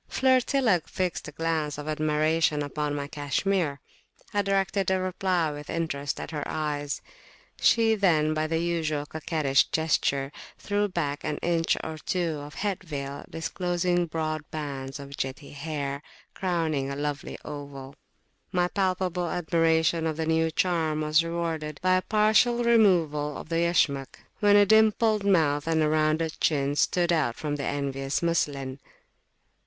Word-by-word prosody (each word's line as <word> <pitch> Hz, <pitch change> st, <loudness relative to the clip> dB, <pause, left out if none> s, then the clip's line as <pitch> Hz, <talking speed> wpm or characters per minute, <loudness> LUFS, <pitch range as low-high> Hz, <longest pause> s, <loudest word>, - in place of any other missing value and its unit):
Flirtilla 260 Hz, -, +3 dB
fixed 185 Hz, -4 st, -2 dB
a -, -, -7 dB
glance 155 Hz, -2 st, -1 dB
of 150 Hz, 0 st, -7 dB
admiration 155 Hz, 0 st, +1 dB
upon 145 Hz, +1 st, -2 dB
my 140 Hz, -1 st, -3 dB
cashmere. 145 Hz, +2 st, -1 dB, 0.5 s
I 205 Hz, -, +2 dB
directed 195 Hz, -1 st, 0 dB
a 190 Hz, 0 st, +2 dB
reply 185 Hz, -3 st, 0 dB
with 145 Hz, 0 st, -8 dB
interest 145 Hz, -4 st, -2 dB
at -, -, -6 dB
her 150 Hz, -2 st, -3 dB
eyes. 145 Hz, -2 st, -3 dB, 0.6 s
She 225 Hz, -1 st, +4 dB
then 160 Hz, -7 st, +3 dB
by 155 Hz, 0 st, 0 dB
the 165 Hz, +1 st, 0 dB
usual 160 Hz, -3 st, -1 dB
coquettish 150 Hz, -3 st, +1 dB
gesture, 140 Hz, -3 st, 0 dB, 0.3 s
threw 205 Hz, 0 st, 0 dB
back 155 Hz, -6 st, -3 dB
an 150 Hz, -1 st, -2 dB
inch 165 Hz, -1 st, +1 dB
or 160 Hz, -1 st, -5 dB
two 165 Hz, -3 st, -1 dB
of 145 Hz, +1 st, -9 dB
head 200 Hz, -3 st, -2 dB
veil, 140 Hz, -3 st, -6 dB
disclosing 175 Hz, +1 st, -1 dB
broad 155 Hz, -1 st, -2 dB
bands 140 Hz, -3 st, -5 dB
of 140 Hz, 0 st, -8 dB
jetty 135 Hz, +2 st, -5 dB
hair, 145 Hz, -1 st, -4 dB, 0.3 s
crowning 160 Hz, -7 st, -1 dB
a 140 Hz, -, -3 dB
lovely 145 Hz, 0 st, -4 dB
oval. 140 Hz, -2 st, -8 dB, 0.6 s
My 180 Hz, -2 st, +1 dB
palpable 185 Hz, -3 st, -1 dB
admiration 165 Hz, -1 st, +2 dB
of 155 Hz, -1 st, -2 dB
the 160 Hz, -, -1 dB
new 160 Hz, 0 st, +2 dB
charm 160 Hz, -3 st, 0 dB
was 155 Hz, +1 st, +3 dB
rewarded 165 Hz, -3 st, -3 dB
by 185 Hz, 0 st, +4 dB
a -, -, 0 dB
partial 220 Hz, +4 st, +3 dB
removal 170 Hz, -11 st, +3 dB
of -, -, -9 dB
the 165 Hz, -, 0 dB
Yashmak, 145 Hz, -5 st, +1 dB, 0.2 s
when 205 Hz, -1 st, +5 dB
a 205 Hz, 0 st, +7 dB
dimpled 220 Hz, 0 st, +4 dB
mouth 155 Hz, -6 st, +2 dB
and 160 Hz, -1 st, +2 dB
a -, -, +3 dB
rounded 155 Hz, +1 st, 0 dB
chin 140 Hz, -2 st, +1 dB
stood 175 Hz, +3 st, +2 dB
out 145 Hz, -8 st, +1 dB
from 150 Hz, -2 st, -3 dB
the 140 Hz, -, -3 dB
envious 140 Hz, +1 st, -2 dB
muslin. 140 Hz, -5 st, -1 dB
160 Hz, 150 wpm, -27 LUFS, 145-180 Hz, 0.6 s, a